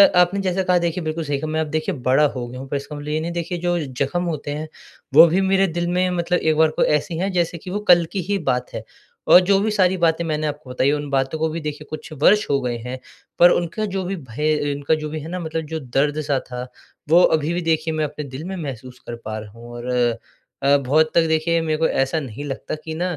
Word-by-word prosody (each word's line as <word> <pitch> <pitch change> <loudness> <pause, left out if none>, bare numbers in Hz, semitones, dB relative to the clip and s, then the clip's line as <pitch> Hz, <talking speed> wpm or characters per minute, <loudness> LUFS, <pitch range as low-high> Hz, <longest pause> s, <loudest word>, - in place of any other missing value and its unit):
आपने 180 +2 +4
जैसा 190 0 0
कहा 180 -1 +3
देखिए 170 0 -2
बिल्कुल 160 +1 -3
सही 145 -2 -1
कहा 155 - -4
मैं 160 0 0
अब 160 - -2
देखिए 155 0 -1
बड़ा 130 +4 +4
हो 125 -2 -4
गया 125 +1 -8
हूँ। 135 - -8
पर - - -2
इसका 140 +2 -8
मतलब 145 0 -8
ये 150 +1 0
नहीं 165 +2 -3
देखिए 170 +1 -3
जो 175 0 0
ज़ख्म 140 +3 -2
होते 155 -4 -3
हैं 150 +2 -4 0.5
वो 160 +4 +10
भी 175 +4 +1
मेरे 195 0 +3
दिल 175 0 -2
में 180 +1 +1
मतलब 175 +1 +1
एक 160 -1 +1
बार 160 0 +5
कोई - - +1
ऐसी 160 +3 -5
हैं 190 +3 -1
जैसे 175 -2 0
कि 175 - -10
वो 200 +3 -2
कल 175 -1 +6
की 195 - -2
ही 205 - +2
बात 125 0 -3
है। - - -5 0.4
और - - +9
जो 195 +2 +3
भी 215 +2 0
सारी 190 -2 +2
बातें 170 -1 +2
मैंने 155 -1 -1
आपको 145 -2 -6
बताई 130 +2 +1
उन 145 0 -2
बातों 135 +2 0
को 160 0 +1
भी 160 +2 -4
देखिए 150 0 -5
कुछ 155 +1 -7
वर्ष 210 +2 +5
हो 140 -1 +2
गए 120 -2 -2
हैं। 125 +2 -6 0.4
पर 175 - +9
उनका 175 +5 -1
जो 190 - -1
भी 195 +2 -2
भय 150 +1 -1
अ, 145 -1 -1
उनका 145 +2 +1
जो 155 -1 -5
भी 155 +1 -4
है 155 - -8
ना 180 +1 -4
मतलब 160 -1 -4
जो 160 +1 -4
दर्द-सा 145 +1 0
था 125 0 -5 0.4
वो 170 +3 +7
अभी 155 +1 +2
भी 175 - -1
देखिए 160 -1 0
मैं 155 -1 0
अपने 150 0 -6
दिल 135 +2 -8
में 190 +1 -4
महसूस 130 -6 -7
कर 120 - -4
पा 110 0 -4
रहा 105 -1 -10
हूँ। 115 +2 -12
और 120 +1 -6 0.7
अ, 140 +1 +5
बहुत 145 +4 +2
तक 170 - +6
देखिए 160 +1 +1
मेरे 155 -1 -1
को 160 +1 +2
ऐसा 135 +4 0
नहीं 135 -1 -7
लगता 135 +1 -4
कि 160 - -5
न 170 - -2
155 Hz, 260 wpm, -21 LUFS, 140-175 Hz, 0.7 s, वो